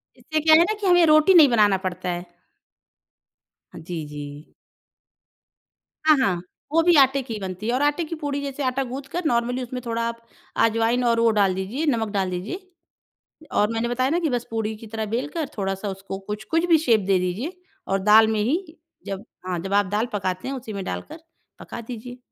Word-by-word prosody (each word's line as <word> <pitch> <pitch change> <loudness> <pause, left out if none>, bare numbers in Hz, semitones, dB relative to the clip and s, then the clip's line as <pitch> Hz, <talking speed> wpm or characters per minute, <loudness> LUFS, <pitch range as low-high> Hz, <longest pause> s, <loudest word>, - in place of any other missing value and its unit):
इससे 315 0 -2
क्या 315 +1 +6
है 330 - +7
ना? 415 +5 0
कि 405 - -1
हमें 355 -1 +6
रोटी 310 +4 +6
नहीं 315 -6 +8
बनाना 210 -5 +4
पड़ता 180 0 -4
है। 175 0 -3 1.5
जी, 160 -1 -6
जी। 145 0 -9 1.5
हाँ, 310 -1 +6
हाँ, 195 -10 +1 0.3
वो 330 +2 +4
भी 350 0 +5
आटे 275 0 +5
की 240 - -6
ही 215 - -5
बनती 190 +2 -5
है 235 - +1
और 255 - +1
आटे 295 +4 +1
की 330 - -5
पूड़ी 290 -2 -3
जैसे 280 0 -4
आटा 260 +1 0
गूँथ 265 +2 -7
कर 355 0 -3
नॉर्मली 245 -1 0
उसमें 250 +1 -6
थोड़ा 230 0 -2
आप 230 0 -6 0.4
अजवाइन 230 +2 +1
और 230 -1 +3
वो 230 0 +4
डाल 200 -3 +3
दीजिए 210 +12 -3
नमक 230 -6 0
डाल 195 -2 0
दीजिए। 285 - -5 0.8
और 210 +2 +2
मैंने 225 +1 -1
बताया 255 +2 +1
ना 335 +4 +1
कि 330 -3 0
बस 245 -2 -2
पूड़ी 220 -1 -2
की 225 - -11
तरह 220 0 -4
बेल 235 +6 -2
कर 315 -2 -3
थोड़ा-सा 195 0 -2
उसको 195 0 -6
कुछ 210 +1 -4
कुछ 330 +1 +2
भी 335 -2 +5
शेप 245 -8 +3
दे 195 -2 +3
दीजिए 210 - -3 0.3
और 195 - +1
दाल 215 +2 +7
में 220 -1 0
ही, 320 - -2 0.3
जब 195 +2 -5 0.2
हाँ 180 -2 -2
जब 195 +3 -4
आप 205 0 +4
दाल 210 +4 0
पकाते 185 -1 -2
हैं 275 - -3
उसी 235 -4 -7
में 200 -1 -4
डालकर 310 +9 -6 0.4
पका - - -8
दीजिए। 245 +1 -8
230 Hz, 205 wpm, -23 LUFS, 200-290 Hz, 1.5 s, नहीं